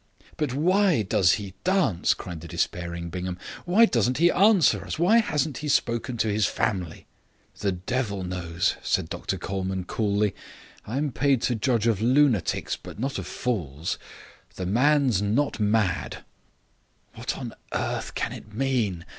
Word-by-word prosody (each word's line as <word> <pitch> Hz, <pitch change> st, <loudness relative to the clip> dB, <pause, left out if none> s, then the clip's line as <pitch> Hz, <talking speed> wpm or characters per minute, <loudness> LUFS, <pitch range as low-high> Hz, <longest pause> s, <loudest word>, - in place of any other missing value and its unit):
"But 150 Hz, -4 st, -1 dB
why 180 Hz, -, +3 dB
does 95 Hz, -2 st, +3 dB
he 100 Hz, -3 st, -4 dB
dance?" 185 Hz, -, +2 dB
cried 85 Hz, -3 st, -7 dB
the 85 Hz, -, -9 dB
despairing 85 Hz, 0 st, -3 dB
Bingham. 90 Hz, 0 st, -4 dB, 0.3 s
"Why 195 Hz, +6 st, +6 dB
doesn't 125 Hz, -, +1 dB
he 170 Hz, +3 st, +5 dB
answer 200 Hz, -3 st, +4 dB
us? -, -, -5 dB
Why 190 Hz, +8 st, +5 dB
hasn't 150 Hz, -, -1 dB
he 150 Hz, -, -5 dB
spoken 120 Hz, -3 st, 0 dB
to 110 Hz, -, +1 dB
his 105 Hz, 0 st, +2 dB
family?" 90 Hz, -6 st, -2 dB, 0.5 s
"The 100 Hz, -2 st, 0 dB
devil 100 Hz, +1 st, -2 dB
knows," 90 Hz, -1 st, -1 dB
said -, -, 0 dB
Dr -, -, -3 dB
Colman 95 Hz, -1 st, -3 dB
coolly. 105 Hz, +1 st, 0 dB, 0.5 s
"I'm 140 Hz, +6 st, -1 dB
paid 130 Hz, +1 st, +1 dB
to 125 Hz, -, +2 dB
judge 115 Hz, 0 st, +1 dB
of 110 Hz, -4 st, +2 dB
lunatics, 125 Hz, -, +2 dB
but -, -, -11 dB
not 135 Hz, +5 st, -2 dB
of -, -, -6 dB
fools. 85 Hz, -, -3 dB, 0.6 s
The 95 Hz, -, -4 dB
man's 130 Hz, +1 st, +3 dB
not 115 Hz, +7 st, 0 dB
mad." 105 Hz, -3 st, 0 dB, 0.9 s
"What -, -, -4 dB
on -, -, -6 dB, 0.2 s
earth -, -, -3 dB
can -, -, -1 dB
it 110 Hz, -, -11 dB
mean? 110 Hz, -8 st, -1 dB
110 Hz, 150 wpm, -26 LUFS, 95-140 Hz, 0.9 s, Why